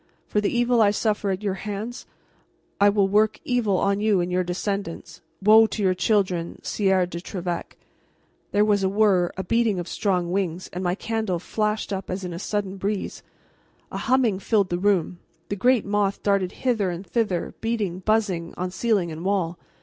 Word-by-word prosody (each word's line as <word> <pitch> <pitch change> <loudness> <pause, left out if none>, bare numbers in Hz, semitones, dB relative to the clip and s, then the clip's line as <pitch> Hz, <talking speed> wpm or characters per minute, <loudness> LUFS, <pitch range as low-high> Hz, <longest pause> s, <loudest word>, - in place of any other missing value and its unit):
For 210 - 0
the 205 - +1
evil 240 -1 +2
I 205 - +6
suffer 210 -1 0
at 190 +2 -2
your 200 -2 0
hands, 215 +4 -5 0.7
I 205 0 +6
will 200 -1 +3
work 210 +2 +2
evil 225 -6 +1
on 200 +2 +1
you 210 -3 +3
and 175 +1 -1
your 185 0 +1
descendants. 180 -2 -4 0.2
Woe 220 +2 +7
to 210 0 -3
your 185 -1 +3
children, 185 -3 0
Sieur 190 -3 +2
de 170 -1 -7
Trevec!'" 180 -2 -5 0.7
There 205 +1 +3
was 205 -2 +2
a 190 - +2
whirr, 195 -4 +3
a 190 - -2
beating 230 +1 +1
of 175 - -5
strong 180 -4 0
wings, 185 -2 -2
and 180 +1 -4
my 180 0 +1
candle 220 -4 -2
flashed 210 +3 -2
up 190 -1 -5
as 185 +1 -3
in 180 -1 -4
a 170 - -5
sudden 200 -1 -3
breeze. 200 +1 -3 0.7
A - - -4
humming 245 -7 +2
filled 200 -2 +1
the 175 - -1
room; 185 -3 +1 0.3
the 200 - -1
great 245 +3 +3
moth 200 -1 0
darted 200 -3 +1
hither 225 -7 +1
and 175 +2 -5
thither, 190 -2 -1
beating, 215 -6 -1
buzzing, 190 -5 0
on 180 +1 -3
ceiling 200 -5 0
and 160 +2 -7
wall. 180 -3 0
200 Hz, 185 wpm, -24 LUFS, 180-215 Hz, 0.7 s, Woe